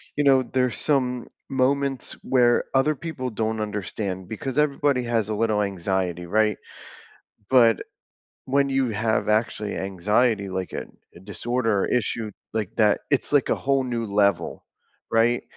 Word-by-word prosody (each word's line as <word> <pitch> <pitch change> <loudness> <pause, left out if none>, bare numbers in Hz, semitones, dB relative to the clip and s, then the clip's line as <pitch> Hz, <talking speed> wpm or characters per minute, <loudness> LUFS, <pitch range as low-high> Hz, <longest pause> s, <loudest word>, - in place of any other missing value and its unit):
you 145 - +1
know, 135 -2 +5
there's 125 -1 0
some 125 -4 0 0.2
moments 135 0 0
where 120 -2 +3
other 140 +3 +3
people 135 -5 -5
don't 110 0 -2
understand 100 -3 -4
because 130 +5 -5
everybody 140 -3 +2
has 115 -3 0
a 105 - -1
little 110 -1 +1
anxiety, 95 -2 -2
right? 105 +3 +2 0.9
But 115 -5 +5 0.6
when 140 +1 +2
you 135 -2 +1
have 110 +1 0
actually 110 -1 0
anxiety, 100 +3 +1
like, 95 0 -4
an - - -7 0.2
a - - -12
disorder 110 +1 -1
or - - +1
issue, 115 -2 -1 0.2
like, 110 -4 -2
that, 105 -2 +4
it's 140 - +1
like 145 - +3
a - - +3
whole 135 -1 +1
new 120 -2 -2
level. 100 -1 +1 0.5
Right? 115 +2 +2
115 Hz, 145 wpm, -24 LUFS, 105-130 Hz, 0.9 s, know